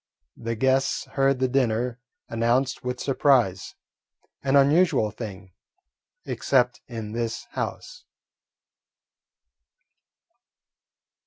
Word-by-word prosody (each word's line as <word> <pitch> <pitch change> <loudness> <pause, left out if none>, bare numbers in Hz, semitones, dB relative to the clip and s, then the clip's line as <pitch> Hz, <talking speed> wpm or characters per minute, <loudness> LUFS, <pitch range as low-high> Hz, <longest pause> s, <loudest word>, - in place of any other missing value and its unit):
The 115 0 -4
guests 130 +3 +1
heard 135 0 +2
the 130 0 +1
dinner 125 -2 0 0.3
announced 120 +4 0
with 125 0 -3
surprise, 130 -9 +2 0.7
an 135 0 +1
unusual 140 -5 +4
thing, 100 -4 -8 0.7
except 125 -2 +1
in 115 -3 -6
this 115 0 -3
house. - - -5
125 Hz, 80 wpm, -25 LUFS, 115-135 Hz, 0.7 s, unusual